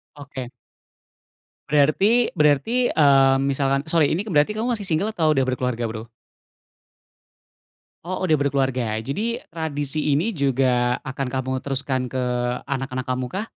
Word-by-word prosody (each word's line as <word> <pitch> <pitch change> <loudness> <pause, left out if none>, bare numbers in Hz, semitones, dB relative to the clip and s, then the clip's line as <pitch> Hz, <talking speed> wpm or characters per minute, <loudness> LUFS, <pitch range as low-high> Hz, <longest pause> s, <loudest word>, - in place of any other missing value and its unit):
Oke. 135 -4 -8 1.2
Berarti 150 +5 +3 0.3
berarti, 150 +5 +3 0.3
eee, 135 -2 +6 0.2
misalkan 135 0 +1
sorry 160 -3 +4
ini 190 +7 -2
berarti 155 -1 +2
kamu 225 +3 -1
masih 205 -3 -3
single 185 +7 0
atau 160 -5 +2
udah 135 -3 +2
berkeluarga 125 -2 -2
Bro? 110 0 -6 2.0
Oh 185 +2 -4
udah 160 - +3
berkeluarga, 135 -6 0
jadi 205 - -3
tradisi 150 -2 -2
ini 175 +11 +1
juga 130 -4 +1
akan 135 +1 -3
kamu 130 0 -3
teruskan 130 -2 -2
ke 130 - -3 0.5
anak-anak 135 -2 -3
kamu 130 -1 -2
kah? 200 +4 -4
140 Hz, 130 wpm, -22 LUFS, 130-155 Hz, 2.0 s, eee